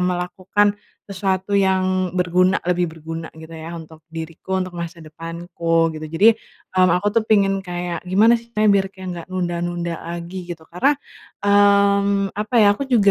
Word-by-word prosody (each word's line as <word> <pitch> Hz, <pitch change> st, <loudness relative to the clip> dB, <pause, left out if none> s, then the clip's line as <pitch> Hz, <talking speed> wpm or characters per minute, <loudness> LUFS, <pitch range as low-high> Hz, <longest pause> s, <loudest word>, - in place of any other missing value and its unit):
melakukan 185 Hz, +3 st, +1 dB, 0.4 s
sesuatu 190 Hz, +1 st, 0 dB
yang 185 Hz, -1 st, +1 dB
berguna 180 Hz, +1 st, +2 dB
lebih 180 Hz, 0 st, +1 dB
berguna 165 Hz, 0 st, -7 dB
gitu 160 Hz, 0 st, -12 dB
ya 165 Hz, +1 st, -7 dB
untuk 160 Hz, -1 st, -10 dB, 0.2 s
diriku 165 Hz, +3 st, -5 dB
untuk 180 Hz, -1 st, -7 dB
masa 170 Hz, 0 st, -6 dB
depanku, 165 Hz, +1 st, -1 dB
gitu. 155 Hz, 0 st, -6 dB
Jadi, 165 Hz, +8 st, +4 dB, 0.5 s
mmm, 185 Hz, -1 st, +5 dB
aku 205 Hz, -, -4 dB
tuh -, -, -1 dB
pengen 195 Hz, -3 st, +3 dB
kayak, 175 Hz, -1 st, -4 dB
"Gimana 210 Hz, +6 st, +5 dB
sih 230 Hz, -, -17 dB
caranya 215 Hz, 0 st, +4 dB
biar 195 Hz, -, 0 dB
kayak 190 Hz, -1 st, -9 dB
nggak 170 Hz, -, -9 dB
nunda-nunda 175 Hz, -1 st, -2 dB
lagi, 175 Hz, +2 st, -6 dB
gitu?" 170 Hz, -2 st, -7 dB
Karena, 270 Hz, +12 st, +2 dB, 0.5 s
mmm, 200 Hz, -1 st, +4 dB
apa 215 Hz, +4 st, -4 dB
ya, 205 Hz, 0 st, +6 dB
aku 275 Hz, -, -3 dB
juga 225 Hz, -6 st, +4 dB
180 Hz, 160 wpm, -21 LUFS, 170-200 Hz, 0.5 s, ya